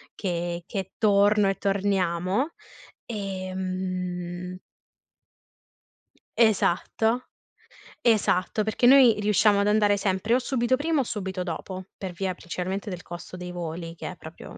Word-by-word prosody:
che 175 -2 -3
che 190 -2 -5
torno 205 -1 +4
e 195 - +1
torniamo, 195 - 0 0.5
ehm 185 -3 -4 1.8
Esatto, 225 +2 +2 0.7
esatto. 215 -4 +2
Perché 220 +3 0
noi 250 -4 +7
riusciamo 210 0 +4
ad 205 - +1
andare 210 -1 +4
sempre 195 +3 0
o - - +3
subito 255 -1 +1
prima 300 +2 0
o - - +3
subito 190 -5 -4
dopo, 185 +2 -5
per 190 -2 -5
via 185 +1 -2
principalmente 185 +4 -4
del 180 -2 -5
costo 175 +1 -9
dei 180 0 -6
voli 165 -1 -5
che - - -6
è - - -10
proprio 160 +1 -11
195 Hz, 125 wpm, -26 LUFS, 180-215 Hz, 1.8 s, noi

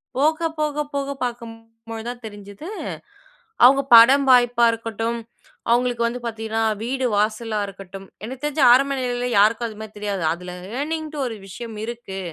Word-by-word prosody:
போக 310 +5 +2 0.2
போக 300 -1 0
போக 280 0 -2
பாக்கும்பொழுது 225 -1 -7
தான் 245 0 -7
தெரிஞ்சுது, 205 - -10 1.0
அவுங்க 270 +2 +6
படம் 265 +5 +7
வாய்ப்பா 245 -1 +4
இருக்கட்டும், 230 +1 -3 0.5
அவுங்களுக்கு 240 0 +2
வந்து 240 +1 -4
பாத்தீங்கன்னா, 225 -1 -2 0.2
வீடு 260 +2 -2
வாசலா 215 +1 0
இருக்கட்டும், 195 0 -10 0.2
எனக்கு 260 +4 -8
தெரிஞ்சு 295 -1 0
ஆரம்ப 275 +3 +4
நிலையில 245 -1 -2
யாருக்கும் 225 +3 +3
அதுமாரி 220 -1 -9
தெரியாது. 205 -3 -3
அதில 180 +1 -8 0.3
ஏர்னிங்ன்ட்டு 310 0 -4
ஒரு 225 -2 -6
விஷயம் 225 +3 -8
இருக்கு. 230 -5 -7
235 Hz, 135 wpm, -22 LUFS, 220-260 Hz, 1.0 s, படம்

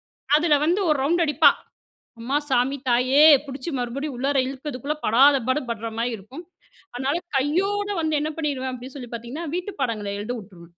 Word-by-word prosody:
வந்து - - -85
அதில 315 -3 +3
வந்து 370 +4 +2
1 300 - +3
ரவுண்ட் 340 +4 +2
அடிப்பா 300 +2 +5 0.7
அம்மா 265 +5 -1
சாமி 260 +2 +2
தாயே 255 +4 +3 0.3
பிடிச்சு 270 +4 -6
மறுபடியும் 265 +4 -4
உள்ளார 275 +2 0
இழுக்கரதுக்குள்ள 275 +1 -4
படாத 275 +6 +6
பாடு 260 +4 +2
படுற 230 0 -4
மாரி 240 +1 0
இருக்கும். 250 - -11 0.5
அதனால 270 +5 -1 0.2
கையோட 390 +9 0
வந்து 315 -1 0
என்ன 305 +1 -2
பண்ணிருவேன் 270 -4 -2
அப்டின்னு 255 +2 -9
சொல்லி 245 -3 -8
பார்த்தீங்கன்னா, 240 +8 -6
வீட்டு 365 +3 -4
பாடங்கள 215 -5 -2
எழுத 225 +4 -4
வுட்டுருவேன். 180 -5 -13
270 Hz, 165 wpm, -23 LUFS, 245-300 Hz, 0.7 s, படாத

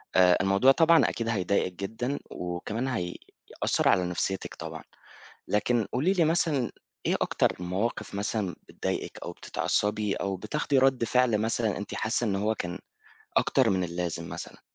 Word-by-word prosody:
آآ 90 -1 +6
الموضوع 95 +7 +5
طبعًا 165 +3 +5
أكيد 115 - -3
هيضايقِك 95 -3 +1
جدًا، 115 +9 -3
وكمان 90 +8 -3
هيأثّر 90 -9 -2
على 90 - +3
نفسيتِك 90 +2 -2
طبعًا، - - -7 0.7
لكن 105 +1 +1
قولي 150 +10 +2
لي 180 -4 +3
مثلًا، 155 -5 +1 0.4
إيه - - +2
أكتر - - +1
المواقِف 95 +5 -2
مثلًا 100 -2 -2
بتضايقِك - - -4
أو - - -5
بتتعصبي 105 -1 -1
أو 100 -1 -2
بتاخدي 135 +8 0
رَد 130 -2 +3
فعل 120 -1 +3
مثلًا 110 -1 0
أنتِ 105 0 -6
حاسة 110 +2 0
إن 100 -2 +1
هو 105 +3 +1
كان 90 -2 -4 0.6
أكتر 130 -4 +3
من 95 -2 +1
اللازم 85 -1 -3
مثلًا؟ - - -8
105 Hz, 145 wpm, -28 LUFS, 95-125 Hz, 0.7 s, آآ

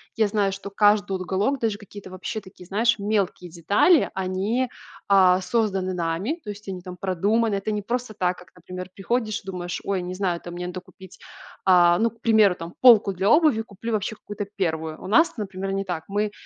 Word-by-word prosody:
Я 220 -2 +3
знаю, 205 -1 +1
что 195 +1 -7
каждый 205 0 +3
уголок, 190 +8 -1
даже 220 -3 -1
какие-то 205 -2 -12
вообще 215 +4 -5
такие, 185 -1 -14
знаешь, 225 +2 +1
мелкие 200 -4 -1
детали, 200 - +3
они, 195 +7 -1 0.4
а, 185 -2 +5
созданы 190 -2 0
нами, 180 - -2
то 210 - -8
есть 205 0 -12
они 185 -1 -5
там 180 0 -8
продуманы. 200 +4 +1
Это 195 +2 -2
не 210 -1 -2
просто 240 +1 -3
так, 180 -3 -1
как, 180 -1 -15
например, 180 +1 -8
приходишь 215 +1 -2
и - - -28
думаешь: 180 -2 -5
"Ой, 195 -2 -1
не 180 +1 -5
знаю 185 -2 -1
там, 175 - -8
мне 180 0 -5
надо 180 0 -6
купить, 185 0 -16 0.5
э, 175 -2 +6
ну, 230 0 +2
к 230 - -26
примеру, 215 -5 +4
там, 165 +1 -8
полку 225 -6 +7
для 190 +3 0
обуви, 300 -8 +4
куплю 225 +1 -6
вообще 215 +1 -2
какую-то 205 0 -6
первую". 160 -4 -2
У - - -6
нас 320 - +4
это, 220 - -7
например, 195 -1 -4
не 195 0 -1
так. 170 -3 -4
Мы, 205 +1 -1
195 Hz, 205 wpm, -24 LUFS, 185-215 Hz, 0.5 s, полку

